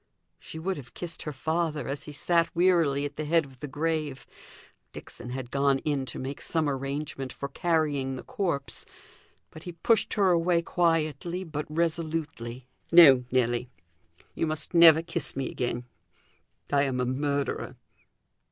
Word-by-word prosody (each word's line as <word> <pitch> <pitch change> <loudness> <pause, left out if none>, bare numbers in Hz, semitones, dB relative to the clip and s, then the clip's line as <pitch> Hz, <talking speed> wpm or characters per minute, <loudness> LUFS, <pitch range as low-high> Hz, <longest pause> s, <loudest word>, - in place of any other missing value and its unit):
She - - -10
would 185 +3 -2
have 130 -4 -11
kissed 170 -2 -5
her 150 - -4
father, 155 -1 -2
as 140 +1 -4
he 150 - -8
sat 170 +3 +1
wearily 165 -6 +3
at 145 0 -6
the 155 - -3
head 165 +1 +3
of 130 -2 -16
the 145 - -5
grave 150 -1 -2 0.7
Dixon 120 - -9
had 125 -1 -6
gone 140 -1 +2
in 140 -3 -1
to 115 - -6
make 135 +2 -5
some 160 -2 0
arrangement 135 -1 -3
for 140 - -5
carrying 145 -4 0
the 130 - -7
corpse 185 - -3 0.7
but 155 - -11
he 175 - -7
pushed 210 +6 +1
her 195 -3 +4
away 170 0 +2
quietly, 165 +1 0
but 150 -4 -5
resolutely 155 -7 -2 0.3
"No, 140 -7 +8
Nelly, 120 -1 +1 0.6
you 165 - -1
must 155 +3 -4
never 165 -1 +8
kiss - - -3
me 135 -1 -2
again; 120 0 -3 0.9
I 140 - +5
am 130 -2 -1
a 125 - +1
murderer." 140 +2 -2
150 Hz, 155 wpm, -27 LUFS, 135-165 Hz, 0.9 s, No